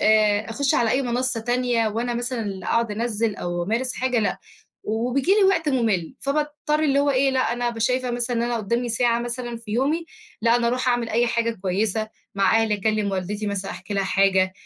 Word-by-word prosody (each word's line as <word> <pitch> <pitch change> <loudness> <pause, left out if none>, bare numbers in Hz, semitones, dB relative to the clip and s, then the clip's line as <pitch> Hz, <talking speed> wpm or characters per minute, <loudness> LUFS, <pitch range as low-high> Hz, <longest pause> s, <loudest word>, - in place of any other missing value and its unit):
أ 215 0 +3
أخش 275 +4 +1
على 230 -2 +2
أي 265 +4 +2
منصة 250 -1 0
تانية، 240 -1 +1
وأنا 235 +3 -2
مثلًا 245 0 -2
اللي 195 -4 -5
أقعد 230 -1 +1
أنزِّل، 225 0 -1
أو 175 0 -3
أمارس 235 +7 -1
حاجة، 255 -1 0
لأ، 215 - 0 0.5
وبييجي 250 - 0
لي 410 0 +4
وقت 380 -5 +2
مُمِل، 225 - 0
فباضطر 300 +1 -1
اللي 280 -2 +2
هو 285 0 +3
إيه، 270 0 +3
لأ، 260 -1 +1
أنا 245 +1 -3
بابقى 235 -1 -2
شايفة 250 +2 +1
مثلًا 240 0 -1
إن 230 - +1
أنا 240 0 -1
قدامي 235 +3 -1
ساعة 235 0 +2
مثلًا 240 0 -4
في 230 -2 -11
يومي، 285 +8 +1 0.4
لأ، 230 +1 +4
أنا 240 -1 0
أروح 250 +2 0
أعمل 240 -2 +1
أي 235 +2 +2
حاجة 230 0 0
كويسة، 205 +3 0 0.3
مع 200 +3 +3
أهلي، 220 -1 +1
أكلّم 210 0 0
والدتي، 195 +3 -3
مثلًا 200 -1 -3
أحكي 180 +3 -7
لها 195 -1 +1
حاجة 190 -1 +2
235 Hz, 205 wpm, -23 LUFS, 215-250 Hz, 0.5 s, لي